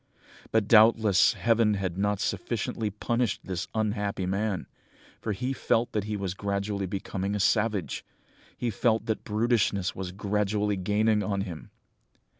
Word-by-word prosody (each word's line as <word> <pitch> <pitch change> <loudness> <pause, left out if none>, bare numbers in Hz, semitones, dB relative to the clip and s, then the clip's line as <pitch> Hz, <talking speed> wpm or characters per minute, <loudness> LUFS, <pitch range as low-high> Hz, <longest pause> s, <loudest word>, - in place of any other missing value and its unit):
"But 110 -2 +2
doubtless 110 -3 +6
Heaven 115 -2 +2
had 95 -3 -2
not 105 +1 0
sufficiently 110 -2 -2
punished 115 +2 -1
this 90 -2 -4
unhappy 105 -3 -1
man, 100 +1 -1 0.5
for 110 - -3
he 125 +6 -2
felt 120 -2 +1
that 105 -2 -1
he 105 -1 -2
was 95 -2 -3
gradually 100 0 -2
becoming 95 +1 -3
a - - -1
savage! 105 -1 +1 0.5
He 120 -2 -1
felt 110 +2 +1
that 110 - -2
brutishness 105 -3 +1
was 95 -1 -5
gradually 105 +1 0
gaining 105 +3 +2
on 100 -2 -1
him! 90 0 -7
105 Hz, 140 wpm, -28 LUFS, 100-110 Hz, 0.5 s, doubtless